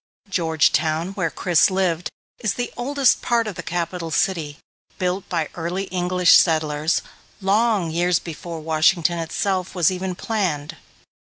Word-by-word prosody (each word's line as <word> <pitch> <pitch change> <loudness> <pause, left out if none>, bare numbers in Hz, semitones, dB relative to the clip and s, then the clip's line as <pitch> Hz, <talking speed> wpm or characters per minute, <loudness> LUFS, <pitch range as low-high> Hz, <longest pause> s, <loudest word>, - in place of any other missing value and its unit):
Georgetown, 160 -1 +1
where 180 -4 -1
Chris 175 -4 +3
lived, 185 -3 0 0.3
is 215 -5 -1
the 245 - -4
oldest 275 +1 +2
part 235 -1 +1
of 210 - -4
the 180 - -6
capital 170 0 -3
city, 150 -2 -1 0.4
built 185 0 -2
by 165 -3 -1
early 175 +3 -3
English 180 -1 +3
settlers 155 -1 +3 0.4
long 200 -3 +1
years 175 +1 +2
before 170 0 -7
Washington 165 +2 +2
itself 185 +3 -2
was 175 -1 +3
even 185 0 -3
planned. 175 -10 -2
175 Hz, 135 wpm, -22 LUFS, 165-190 Hz, 0.4 s, Chris